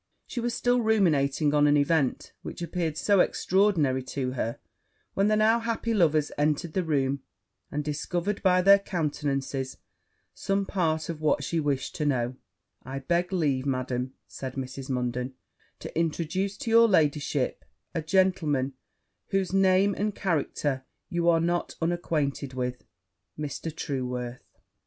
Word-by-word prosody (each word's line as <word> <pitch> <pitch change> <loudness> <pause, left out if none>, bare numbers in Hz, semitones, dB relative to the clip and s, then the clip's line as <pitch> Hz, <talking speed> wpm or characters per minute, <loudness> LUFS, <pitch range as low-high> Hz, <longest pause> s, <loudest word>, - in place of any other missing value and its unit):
She 245 - -5
was 240 0 -1
still 245 0 +2
ruminating 155 -9 +2
on 150 0 +5
an 145 0 +5
event 145 -2 +1
which - - -6
appeared 165 -2 -2
so 200 +2 +3
extraordinary 180 -9 +2
to 130 -1 -2
her, 120 -2 -2 0.6
when 195 +1 +2
the 215 - +3
now 220 +2 +4
happy 230 0 -1
lovers 155 -7 +3
entered 155 +2 +1
the 185 - +1
room, 140 -4 0 0.5
and 150 +1 -2
discovered, 175 +6 -2
by 185 -1 +4
their 200 +1 +8
countenances, 145 -7 -2 0.6
some 195 0 -1
part 160 -5 0
of 160 -2 -5
what 150 -2 +2
she 165 +4 -1
wished 145 -3 -1
to 150 - 0
know: 125 -2 0 0.5
'I 130 +2 -5
beg 175 +6 0
leave, 145 -7 0
Madam,' 130 -1 -2
said 130 -1 -7
Mrs. 135 0 -6
Munden, 125 0 -2 0.4
'to - - -9
introduce 170 +4 -1
to 250 -5 -3
your 230 0 +7
ladyship 150 - +1 0.3
a 165 - -1
gentleman 155 -6 +1 0.5
whose 195 -2 -1
name 195 +1 +4
and 210 0 -1
character 145 -6 -1 0.3
you 175 -2 +1
are 165 -1 +4
not 175 +1 -1
unacquainted 155 -5 -1
with, 125 -1 -3 0.5
Mr. 150 +2 -4
Trueworth.' 125 -5 -4
155 Hz, 140 wpm, -27 LUFS, 135-185 Hz, 0.6 s, their